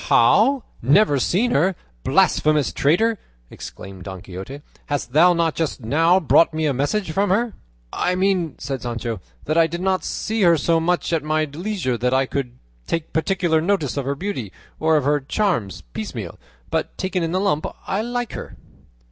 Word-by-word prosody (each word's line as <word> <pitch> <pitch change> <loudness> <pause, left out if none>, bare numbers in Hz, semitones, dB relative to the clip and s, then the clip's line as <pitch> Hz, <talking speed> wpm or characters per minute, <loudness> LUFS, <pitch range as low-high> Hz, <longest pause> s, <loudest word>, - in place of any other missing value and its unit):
"How! 275 -3 +4 0.2
never 145 - +4
seen 215 - +1
her, 190 -5 +2 0.3
blasphemous 150 -2 +2
traitor!" 205 +9 +2 0.3
exclaimed 95 0 -10
Don 95 -2 -7
Quixote; 95 +11 -8 0.2
"hast 145 -4 -3
thou 175 +4 +6
not 165 -2 +1
just 160 -4 -2
now 165 +10 +3
brought 165 -1 +4
me 160 0 0
a 145 - +2
message 160 +8 -1
from 200 +5 +1
her?" 220 +4 +1 0.4
"I 180 - 0
mean," 185 -5 +1
said 135 -2 -4
Sancho, 115 -4 -4 0.2
"that 155 +2 +2
I 165 - +5
did 170 +2 -5
not 190 0 +1
see 220 0 -2
her 170 -3 +5
so 165 +2 +2
much 175 +1 0
at 165 - +2
my 155 +1 +1
leisure 155 - -3
that 125 +2 +1
I 135 0 +3
could 125 -2 -4 0.3
take 165 -1 -3
particular 170 -1 +1
notice 170 -6 0
of 140 -2 -2
her 140 +1 -1
beauty, 140 - -4 0.3
or 160 0 +3
of 150 - 0
her 145 +2 +2
charms 135 - -1
piecemeal; - - -6 0.3
but - - -2
taken 185 -1 -1
in 165 -1 -1
the 185 - +1
lump 190 -6 0 0.2
I 195 - 0
like 245 +1 -3
her." - - -8
160 Hz, 180 wpm, -22 LUFS, 140-190 Hz, 0.4 s, thou